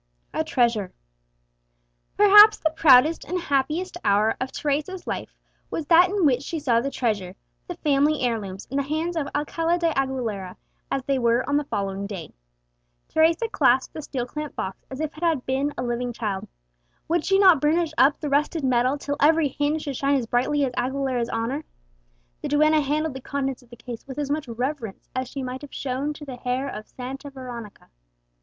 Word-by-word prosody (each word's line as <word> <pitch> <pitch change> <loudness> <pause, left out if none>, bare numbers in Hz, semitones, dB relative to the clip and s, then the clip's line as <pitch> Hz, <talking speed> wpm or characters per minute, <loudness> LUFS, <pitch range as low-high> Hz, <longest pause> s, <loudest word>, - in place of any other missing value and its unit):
A 315 - 0
TREASURE. 235 -10 +1 1.3
Perhaps 415 +1 +8
the 315 - 0
proudest 310 0 +5
and 365 +1 -3
happiest 315 +4 -1
hour 210 +2 +3
of 260 0 -2
Teresa's 305 +6 -2
life - - -5 0.3
was 320 - -3
that 345 +3 +6
in 395 -3 +1
which 255 -3 +3
she 325 +3 -4
saw 240 -6 +2
the 275 - -2
treasure, 205 -9 -2 0.3
the 355 - -5
family 295 -1 +2
heirlooms, 210 -6 -2
in 275 - -1
the - - +2
hands 315 +5 -2
of 305 -4 -1
Alcala 330 +4 0
de 335 -1 +1
Aguilera, 235 -9 -2 0.3
as 270 - -1
they 270 0 0
were 235 +1 +2
on 285 - +1
the 295 - -1
following 200 -4 -3
day. 185 -7 -7 0.8
Teresa 325 +7 +3
clasped 265 - +2
the 310 - -6
steel 260 -4 -4
clamped 300 +3 -6
box 190 0 -5
as 265 - -7
if 310 -1 -3
it 310 - -12
had 320 -7 +1
been 270 +2 0
a - - -2
living 240 0 -2
child. 210 -5 -3 0.6
Would 335 -1 +1
she 390 - +3
not 370 -7 +6
burnish 320 +1 +1
up 280 0 +4
the 300 - -4
rusted 295 +2 0
metal 255 +1 +2
till 285 0 -4
every 310 0 +4
hinge 290 +3 -1
should 280 -3 -4
shine 280 +1 +2
as 260 -4 0
brightly 260 +5 +1
as 250 - -4
Aguilera's 255 -1 -1
honour! 235 +7 -2 0.8
The - - -3
duenna 305 +1 +4
handled 300 +1 -1
the 265 - -8
contents 270 -1 -3
of 245 - -22
the 240 - -11
case 240 0 -9
with 265 - -8
as 285 -1 -2
much 295 -2 -2
reverence 240 -2 -4
as 255 0 -2
she 275 0 -5
might 255 +1 -5
have 290 - -10
shown 275 +2 -2
to 295 0 -10
the 260 -3 -7
hair 255 +2 -2
of 215 -5 -7
Santa 270 +3 -7
Veronica! 245 - -9
275 Hz, 190 wpm, -24 LUFS, 245-305 Hz, 1.3 s, Perhaps